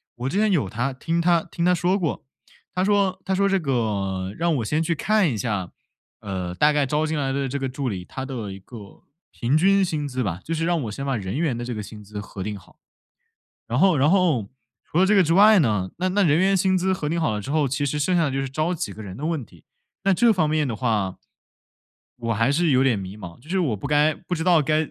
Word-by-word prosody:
我 125 +2 -3
之 185 - -2
前 215 +1 +3
有 140 - +1
他 125 +5 -2
听 165 +6 -2
他 170 -1 +3
听 170 - -3
他 180 0 +4
说 180 +4 +1
过， 165 -5 -3 0.5
他 180 - 0
说 195 -2 +1
他 190 - 0
说 200 +1 +2
这 195 0 +2
个 100 - -2
让 170 -1 +1
我 115 - -2
先 150 +8 0
去 165 +1 0
看 210 +1 +2
一 125 - -2
下， 100 -4 -2 0.5
呃， 90 -3 -4
大 150 +10 +4
概 145 -1 +2
招 150 +3 0
进 155 0 -2
来 135 -2 -1
的 140 0 -1
这 140 +2 -3
个 135 - -2
助 130 0 -3
理， 90 -4 -5
他 130 - -6
的 115 -7 -5
一 95 - -10
个 105 -1 -13 0.3
平 130 +5 0
均 195 +4 +4
薪 155 -5 -2
资 130 -2 -2
吧， 90 -5 -3
就 165 - -3
是 165 0 -1
让 170 -2 +1
我 110 - -4
先 135 +6 -5
把 135 -3 0
人 95 +2 -4
员 150 -7 0
的 120 - -5
这 120 -1 -4
个 105 - -4
薪 105 +1 -10
资 105 0 -7
核 100 -1 -9
定 105 +2 -4
好。 95 - -19 0.9
然 120 +2 -1
后 185 0 +4
然 145 +3 +3
后， 165 - +2 0.3
除 160 - -2
了 190 - +5
这 210 - +3
个 195 - +6
之 165 -1 +1
外 205 +2 +7
呢， 105 - 0
那 185 +1 0
那 200 +2 +2
人 155 -2 +3
员 195 +1 +3
薪 190 0 +2
资 185 +1 +1
核 155 -5 -2
定 170 +2 -1
好 155 - +1
了 105 - -2
之 135 +7 -5
后， 150 -3 +2
其 140 +3 -1
实 150 +2 -2
剩 180 +5 +1
下 170 - +3
的 140 - -1
就 135 - -1
是 135 - -3
招 155 +6 -1
几 125 - -4
个 110 - -11
人 95 -2 -8
的 150 - -4
问 160 -6 -2
题， 85 -5 -20 0.4
那 195 - +3
这 230 +5 +4
方 160 -7 +1
面 155 -1 +1
的 120 - -3
话 105 -5 -1 1.0
我 115 -1 -1
还 115 +5 +2
是 165 +2 +2
有 130 0 +4
点 130 -5 +2
迷 95 +1 -7
茫， 85 -5 -10
就 145 +6 -18
是 190 +1 +1
我 135 - 0
不 100 - -5
该 150 +1 +3
不 180 +3 -5
知 160 - -3
道 175 -3 +4
该 155 +1 0
145 Hz, 285 characters per minute, -23 LUFS, 115-170 Hz, 1.0 s, 外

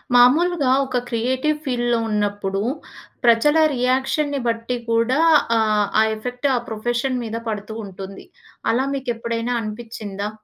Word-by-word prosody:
మాములుగా 285 +3 +5
ఒక 260 - -2
క్రియేటివ్ 260 +6 0
ఫీల్డ్‌లో 240 -2 +1
ఉన్నప్పుడు, 205 -2 -1 0.6
ప్రజల 240 +7 +5 0.2
రియాక్షన్‌ని 265 +3 0
బట్టి 230 +2 -1
కూడా 230 +5 +2 0.4
ఆహ్, 215 -1 +2
ఆ - - +6
ఎఫెక్ట్ 250 +5 -3
ఆ - - +2
ప్రొఫెషన్ 240 +4 -1
మీద 225 0 -4
పడుతూ 210 0 -5
ఉంటుంది. 195 0 -9 0.5
అలా 250 +4 +1
మీకు 265 -2 -4
ఎప్పుడైనా 230 +1 -2
అనిపించిందా? 215 -2 -5
235 Hz, 120 wpm, -21 LUFS, 215-255 Hz, 0.6 s, ఆ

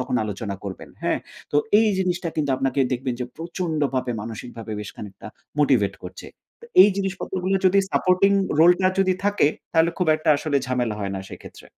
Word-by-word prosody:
তখন 125 - -3
আলোচনা 100 0 -4
করবেন 95 -1 -7
হ্যাঁ? - - +1 0.3
তো - - +2 0.2
এই 220 - +3
জিনিসটা 180 -2 -1
কিন্তু 145 -3 0
আপনাকে 135 +1 0
দেখবেন 125 0 -2
যে, - - -1
প্রচন্ডভাবে 155 -7 -2
মানসিকভাবে 115 0 -7
বেশ 105 - -7
খানিকটা 105 0 -10 0.3
মোটিভেট 125 -9 +3
করছে। 90 +1 -9 0.3
তো - - -11 0.2
এই 205 - +7
জিনিসপত্র 195 -1 -3
গুলো 195 +1 +2
যদি 195 +2 +4
সাপোর্টিং 185 +1 +3 0.3
রোলটা 175 +3 +5
যদি 190 -1 +3
থাকে 205 -7 +3 0.3
তাহলে 165 +1 +4
খুব 180 - +1
একটা 155 - -4
আসলে 145 0 -1
ঝামেলা 125 -3 -1
হয় 100 -1 -3
না 95 - -4
সেক্ষেত্রে। - - -12
145 Hz, 175 wpm, -23 LUFS, 115-180 Hz, 0.3 s, এই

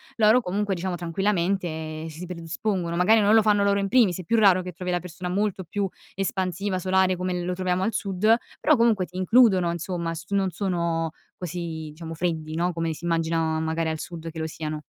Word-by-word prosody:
loro 220 +2 +5
comunque, 205 0 -1
diciamo 185 0 -2
tranquillamente, 170 -3 -1
si 160 +3 -8
predispongono. 170 +1 -3
Magari 185 +6 +5
non 210 +1 +4
lo 220 - +6
fanno 205 -1 +3
loro 200 0 +3
in 195 - 0
primis 200 -5 +3
è - - -5
più 230 +8 +1
raro 190 -3 +5
che 180 - -6
trovi 180 +1 -6
la 180 0 +1
persona 180 +1 -7
molto 195 +1 -1
più 195 +4 -2 0.3
espansiva, 190 0 -1
solare 185 0 +2
come 180 -1 -2
lo 180 - -2
troviamo 185 0 -1
al 225 - 0
sud, 200 +3 +2 0.2
però 310 - +4
comunque 230 -6 +3
ti 180 - -19
includono, 190 -2 +4
insomma, 170 0 -3
s 170 +1 -8
non 195 -1 +1
sono 170 -3 -1 0.3
così, 165 -3 -5
diciamo, 165 +1 -8
freddi 160 -2 -2
no, 175 +2 0
come 165 -1 -2
si 160 - -9
immaginano 165 -1 0
magari 160 0 -1
al 160 0 -3
sud 165 -1 -7
che 160 - -8
lo 160 - -2
siano. 155 -1 -5
180 Hz, 200 wpm, -25 LUFS, 165-195 Hz, 0.3 s, lo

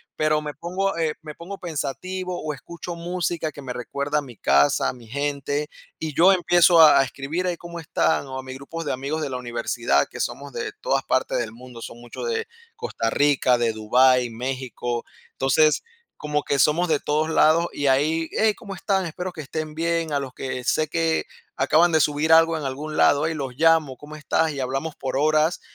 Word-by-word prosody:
Pero 155 0 +1
me 150 -1 -5
pongo, 185 +5 -2
eh, 160 -2 0
me 155 -1 -8
pongo 185 +6 -8
pensativo 180 +3 -4
o 155 -1 -3
escucho 170 +4 -8
música 170 -2 -2
que 145 - -11
me 130 -2 -6
recuerda 140 +4 -2
a - - -4
mi 125 -5 -11
casa, 70 0 +3
a - - -4
mi 120 -3 -15
gente, 145 +3 -2 0.3
y 155 -2 -4
yo 180 +5 +6
empiezo 175 -2 +5
a 150 -3 +8
a - - +5
escribir: 145 +7 -3
"Ay, 175 -1 -1
¿cómo 170 0 -8
están?". 150 -3 0
O 130 - -6
a 130 - -5
mis 130 0 -8
grupos 165 +4 -7
de - - -1
amigos 140 +5 -3
de 150 - -2
la 130 - -3
universidad, 120 - 0
que - - -9
somos 140 +1 -4
de - - -4
todas 135 0 0
partes 130 - 0
del 115 -2 -3
mundo, 120 0 -12
son 120 - -8
muchos 120 - -7
de 455 0 -2 0.3
Costa 450 - -2
Rica, 140 -3 +3
de 120 -1 +1
Dubái, 125 +3 +3
México. 120 0 -4 0.3
Entonces, 150 +3 +2 0.3
como 150 -1 -2
que 140 - 0
somos 165 +5 +3
de 155 -2 +2
todos 155 +2 0
lados 160 +1 +4
y 145 - -1
ahí: 155 +5 +2
"¡Hey!, 220 -1 +3
¿cómo 200 -2 -8
están? 190 0 0
Espero 180 +3 -5
que 160 -3 -8
estén 155 +2 -5
bien". 165 0 -1
A 140 - +2
los 130 -2 -6
que 130 -1 -5
sé 155 - +1
que 165 0 0 0.3
acaban 170 +2 +3
de 160 - +5
subir 150 +3 +2
algo 165 0 +5
en 150 - -5
algún 145 +4 -4
lado, 145 +2 +4
hey, 160 - 0
los 135 -4 -4
llamo: 160 -4 +3
"¿Cómo 150 +1 -11
estás?" 160 +1 +1
Y 140 - -6
hablamos 135 +4 -3
por 130 - -4
horas, 155 +3 +2
150 Hz, 205 wpm, -23 LUFS, 130-165 Hz, 0.3 s, a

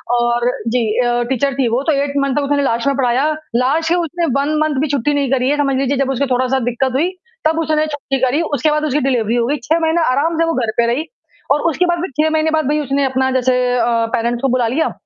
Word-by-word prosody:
और 240 0 +1 0.2
जी 240 +1 +1 0.2
अ, 240 0 +1
टीचर 270 +1 0
थी 270 -3 +1
वो, 240 +3 0
तो 320 - +1
8th 280 -1 -1
तक 295 - +1
उसने 285 0 0
लास्ट 235 0 0
में 280 - +2
पढ़ाया, 265 +3 +1 0.2
लास्ट 285 +7 +1
के 345 - +3
उसने 345 0 -1
1 300 +2 0
मंथ 300 -3 -1
भी 305 - 0
छुट्टी 285 0 0
नहीं 285 -2 0
करी। 260 -1 +1
ये 295 - +1
समझ 275 -2 +1
लीजिए 275 +1 0
जब 275 0 0
उसको 270 +1 0
थोड़ा-सा 255 +1 +1
दिक्कत 260 +2 -1
हुई, 305 +7 +1 0.4
तब 320 +1 0
उसने 310 -1 +1
छुट्टी 290 -2 -3
करी 270 +5 +1
उसके 295 +4 +1
बाद 305 0 0
उसकी 295 0 0
डिलीवरी 235 -3 0
हो 235 -1 +1
गयी। 290 +3 0
6 320 +6 +1
महीने 325 +1 +1
आराम 315 +5 0
से 330 - +3
वो 330 - 0
घर 220 - -2
पे 235 - +3
रही 300 +6 -2 0.5
और 295 +2 +3
उसके 330 +3 +1
बाद 345 -1 0
फिर 365 - -4
6 315 - +2
महीने 315 0 +1
बाद 315 -1 +1
भई 300 +1 +1
उसने 280 -1 -1
अपना 260 0 0
जैसे 255 0 +1 0.2
अ, 230 - +2 0.3
पेरेंट्स 235 +1 -1
को 270 - +1
बुला 240 -2 +1
लिया 270 +8 0
275 Hz, 255 wpm, -17 LUFS, 250-310 Hz, 0.5 s, के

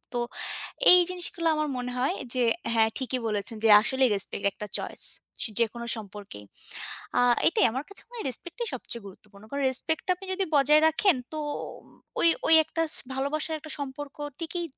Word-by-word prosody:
তো 240 - 0 0.7
এই 360 - +9
জিনিসগুলো 345 -2 0
আমার 305 0 -1
মনে 250 0 -4
হয় 270 +9 +1 0.2
যে 255 - +1 0.3
হ্যাঁ, 220 -1 +3
ঠিকই 260 -1 -2
বলেছেন 210 +1 -1
যে - - +5
আসলেই 260 +3 +2
respect 200 0 +2
একটা 210 - -8
choice - - 0 0.5
যেকোনো 235 +1 -1
সম্পর্কে। 205 - -10 0.8
আ - - +4 0.3
এটাই 430 - +3
আমার 260 +5 -4
কাছে 400 - -3
মনে 485 - -13
হয় 450 - -6
respect 340 +8 -3
টাই 475 -1 -3
সবচেয়ে 235 -3 -6
গুরুত্বপূর্ণ। 200 +1 -15
কারণ 280 0 -3
respect 320 +5 +2
টা - - -1
আপনি 385 - -12
যদি 385 +1 0
বজায় 300 +2 +5
রাখেন 320 +2 +2 0.2
তোম 300 -1 -6 0.4
ওই, 335 - +6 0.2
ওই, 320 - +5
একটা 330 - -3
স - - -1 0.2
ভালোবাসার 305 +4 -2
একটা 310 0 -11
সম্পর্ক 285 0 -7 0.2
টিকই 340 +1 -3
280 Hz, 175 wpm, -27 LUFS, 235-325 Hz, 0.8 s, এই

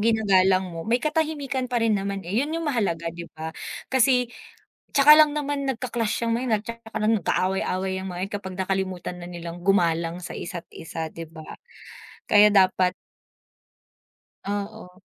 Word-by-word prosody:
ginagalang 195 -4 +3
mo 165 - -5
may 230 +2 +3
katahimikan 300 -4 -1
pa 240 - +1
rin 225 -1 +3
naman 195 0 -3
eh, 180 +4 -5
yun 290 +3 -2
yung 330 - -3
mahalaga, 170 -9 -1
di 170 0 -8
ba? 160 +1 -5 0.4
Kasi 250 -1 +3 0.6
tsaka 290 +2 +8
lang 305 -1 +6
naman 290 -1 -2
nagka-clash 240 -4 -2
yang 230 - +2
mga 240 - -2
yan 225 - +2
at - - -28 0.2
saka 225 0 -5
lang 215 +1 +3
nag-aaway-away 190 0 0
yang - - -5
mga 175 - -6
yan - - -39
kapag 190 -2 -6
nakalimutan 190 -2 -2
na 175 - -8
nilang 170 0 -7
gumalang 170 -3 +2
sa 175 - -7
isa't 170 -1 -6
isa, 160 0 -5
di 165 - -8
ba? 160 -1 -12 0.8
Kaya 210 0 +7
dapat 185 -1 +4 1.5
Oo. 200 -2 -5
195 Hz, 165 wpm, -25 LUFS, 180-240 Hz, 1.5 s, tsaka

